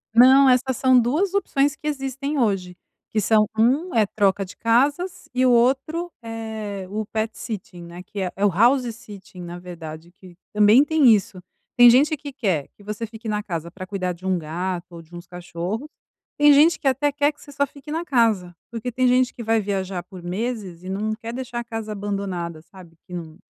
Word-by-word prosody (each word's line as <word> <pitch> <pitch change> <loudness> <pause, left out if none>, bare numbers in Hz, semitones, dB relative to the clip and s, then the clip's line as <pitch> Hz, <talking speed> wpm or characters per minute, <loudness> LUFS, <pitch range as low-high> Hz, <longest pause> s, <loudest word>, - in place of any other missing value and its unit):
Não 260 +3 +7
essas 255 0 +2
são 260 -1 +5
2 305 +12 0
opções 290 -8 +1
que 300 - -8
existem 275 0 -3
hoje 190 -6 -1 0.3
que 215 - +1
são 215 +1 +3
um 270 +11 +2
é 215 -3 +4
troca 200 -1 +1
de 185 - -11
casas 285 +10 +1
e 255 +1 +3
o 255 - +5
outro 270 +8 +1
é 220 -4 -6
o 215 +2 -3
Pet 220 0 -3
Sitting, 190 -5 -7
né, 170 +1 -10
que 200 +2 -8
é 185 -2 -2
é 195 - -3
o - - +5
House 240 +9 +4
Sitting 200 -6 -12
na 175 0 -7
verdade 170 -2 -9
que 180 -1 -16 0.2
também 210 +5 +6
tem 305 -2 +3
isso. 205 -2 -1 0.4
Tem 245 0 +9
gente 285 +6 +4
que 285 0 -9
quer 190 - -1
que 205 - -18
você 210 +2 -4
fique 225 0 -10
na 210 -1 -1
casa 170 -4 -5
pra 185 +1 -8
cuidar 185 -2 -2
de 175 +2 -13
um 190 -1 +1
gato 175 +2 -4
ou 165 - -9
de 165 +1 -15
uns 175 +1 -9
cachorros, 180 - -5 0.5
tem 295 0 +7
gente 310 +4 +5
que - - -2
até 270 +2 +2
quer 290 +1 +1
que 295 - -24
você 285 - -13
só 280 0 +1
fique 280 +2 -12
na 325 +2 -2
casa, 220 - +1 0.2
porque 235 +1 -4
tem 255 +2 +1
gente 250 0 +3
que 235 - -8
vai 225 0 +2
viajar 190 -3 -3
por 180 0 -12
meses 190 -2 -4
e 185 - -7
não 210 +3 -2
quer 230 +1 -7
deixar 245 -1 -5
a - - -4
casa 225 -2 -6
abandonada 195 -5 -4
sabe 170 -1 -16
que 180 - -11
não. 165 -1 -7
220 Hz, 210 wpm, -23 LUFS, 185-260 Hz, 0.5 s, Tem